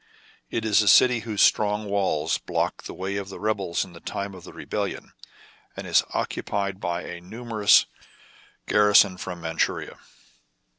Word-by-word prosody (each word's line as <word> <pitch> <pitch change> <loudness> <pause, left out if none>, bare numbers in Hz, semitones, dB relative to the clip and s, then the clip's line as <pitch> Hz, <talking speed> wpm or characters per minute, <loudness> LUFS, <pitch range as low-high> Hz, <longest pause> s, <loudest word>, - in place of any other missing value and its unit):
It 115 - -3
is 110 -1 +4
a 105 - -1
city 125 +4 +6
whose 110 -3 0
strong 105 0 +2
walls 100 -7 0
blocked - - -3
the - - -8
way 95 +2 -4
of 100 -1 -5
the 95 - -9
rebels 100 -5 -1
in 90 - -15
the 85 - -12
time 100 +3 -5
of 90 -2 -12
the - - -11
rebellion, - - -5 0.6
and - - -6
is - - +3
occupied 100 -1 -2
by 85 -1 -3
a 90 -1 -8
numerous 110 +2 +3 0.8
garrison 105 -3 +4
from 90 -1 -7
Mand 80 0 -5
shuria. - - -1
100 Hz, 160 wpm, -25 LUFS, 90-105 Hz, 0.8 s, city